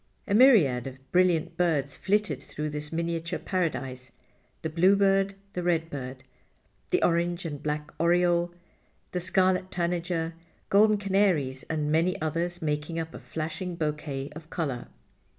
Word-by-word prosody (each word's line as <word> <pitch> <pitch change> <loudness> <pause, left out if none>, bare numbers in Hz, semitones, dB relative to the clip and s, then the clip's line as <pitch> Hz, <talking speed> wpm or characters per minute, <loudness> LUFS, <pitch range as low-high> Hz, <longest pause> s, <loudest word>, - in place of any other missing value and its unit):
A 200 - 0
myriad 195 - +6
of 135 0 -11
brilliant 175 -2 +2
birds 150 -6 +1
flitted 205 +1 0
through 150 0 -5
this 150 0 -4
miniature 165 0 -2
paradise, 135 -9 -3 0.5
the 160 - -1
bluebird, 195 +3 +3 0.2
the 180 - -2
redbird, 145 -7 -2 0.7
the - - +2
orange 170 +1 +1
and 145 -3 -5
black 150 0 -3
oriole, 175 0 +3 0.6
the 180 - -1
scarlet 185 +1 +2
tanager, 170 -1 -1 0.4
golden 215 +1 +5
canaries 190 -10 +1
and 150 -2 -1
many 175 +5 +2
others, 170 +3 -2
making 150 +2 -2
up 165 0 -4
a - - -8
flashing 165 +3 -4
bouquet 150 -3 -3
of 160 0 -10
color. 140 -10 -3
165 Hz, 135 wpm, -28 LUFS, 150-180 Hz, 0.7 s, myriad